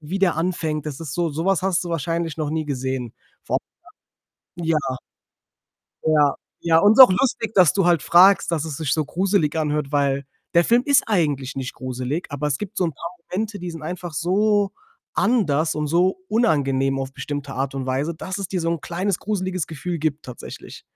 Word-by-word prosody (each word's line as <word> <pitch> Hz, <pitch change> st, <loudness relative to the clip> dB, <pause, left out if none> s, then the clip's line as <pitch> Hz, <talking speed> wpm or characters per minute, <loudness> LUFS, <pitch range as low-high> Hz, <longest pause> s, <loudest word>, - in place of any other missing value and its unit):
wie 165 Hz, +6 st, -4 dB
der 190 Hz, -4 st, +2 dB
anfängt, 160 Hz, -3 st, -2 dB
das 150 Hz, -1 st, -5 dB
ist 150 Hz, -4 st, -5 dB
so 175 Hz, -2 st, 0 dB
so 155 Hz, +3 st, -3 dB
was 195 Hz, -3 st, +2 dB
hast 190 Hz, -1 st, +1 dB
du -, -, -5 dB
wahrscheinlich 165 Hz, 0 st, -2 dB
noch 155 Hz, -2 st, -2 dB
nie 155 Hz, 0 st, -2 dB
gesehen. 130 Hz, -3 st, -3 dB, 0.3 s
Vor -, -, 0 dB, 1.0 s
allem 170 Hz, -, -4 dB
ja. 165 Hz, -, +3 dB, 1.3 s
Ja, 150 Hz, -3 st, +3 dB, 0.3 s
ja, 165 Hz, -1 st, +4 dB
und 205 Hz, +4 st, +6 dB
ist 225 Hz, -, 0 dB
auch 260 Hz, -6 st, +11 dB
lustig, 225 Hz, +2 st, 0 dB
dass 180 Hz, -5 st, +5 dB
du 195 Hz, -3 st, +1 dB
halt 170 Hz, -4 st, +3 dB
fragst, 185 Hz, +2 st, +5 dB
dass 160 Hz, -2 st, -1 dB
es 155 Hz, -3 st, -5 dB
sich 155 Hz, -4 st, -2 dB
so 155 Hz, -2 st, 0 dB
gruselig 180 Hz, -1 st, 0 dB
anhört, 150 Hz, -2 st, -1 dB
weil 140 Hz, -1 st, +1 dB, 0.3 s
der 170 Hz, -, +5 dB
Film 240 Hz, +6 st, +3 dB
ist 280 Hz, -2 st, +4 dB
eigentlich 145 Hz, -, 0 dB
nicht 135 Hz, -1 st, -4 dB
gruselig, 130 Hz, +5 st, -4 dB
aber 145 Hz, +1 st, -2 dB
es 140 Hz, -2 st, 0 dB
gibt 210 Hz, +3 st, -7 dB
so -, -, +2 dB
'n 165 Hz, -, -3 dB
paar 170 Hz, +5 st, -6 dB, 0.2 s
Momente, 205 Hz, +1 st, -3 dB
die 175 Hz, -1 st, -5 dB
sind 165 Hz, -1 st, -9 dB
einfach 175 Hz, +1 st, -5 dB
so 200 Hz, +4 st, +2 dB, 0.4 s
anders 165 Hz, -, +1 dB
und 150 Hz, 0 st, -1 dB
so 180 Hz, +4 st, +2 dB
unangenehm 135 Hz, -, +1 dB
auf 135 Hz, 0 st, -4 dB
bestimmte 145 Hz, -1 st, -5 dB
Art 135 Hz, +1 st, -3 dB
und 135 Hz, -1 st, -3 dB
Weise, 135 Hz, +5 st, -1 dB
dass 185 Hz, +3 st, -5 dB
es 195 Hz, -2 st, -4 dB
dir 185 Hz, -1 st, -2 dB
so 165 Hz, -, 0 dB
'n 170 Hz, -3 st, -3 dB
kleines, 185 Hz, +2 st, -2 dB
gruseliges 185 Hz, -4 st, -2 dB
Gefühl 160 Hz, +3 st, -4 dB
gibt 155 Hz, 0 st, -2 dB
tatsächlich. 125 Hz, -, -10 dB
165 Hz, 200 wpm, -22 LUFS, 145-185 Hz, 1.3 s, auch